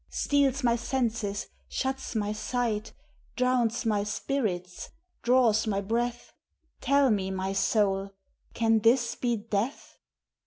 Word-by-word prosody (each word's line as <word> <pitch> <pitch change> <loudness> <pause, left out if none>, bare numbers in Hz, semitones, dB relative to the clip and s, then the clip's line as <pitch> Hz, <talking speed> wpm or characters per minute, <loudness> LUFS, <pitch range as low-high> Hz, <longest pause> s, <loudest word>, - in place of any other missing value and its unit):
Steals 280 -2 +1
my 235 -1 +3
senses, 225 -4 -2 0.2
shuts 265 -2 -3
my 210 -1 0
sight, 220 0 -2 0.4
Drowns 250 -2 +1
n^ 210 -3 0
spirits, 205 -7 -3 0.3
draws 235 -3 +3
my 200 -2 0
breath? 235 +4 -2 0.5
Tell 280 -2 +3
me, 195 -3 0
my 190 0 -2
soul, 195 -1 +1 0.5
can 225 -1 +3
this 235 +2 +3
be 240 -1 -1
death 215 +4 -3
225 Hz, 115 wpm, -28 LUFS, 205-250 Hz, 0.5 s, my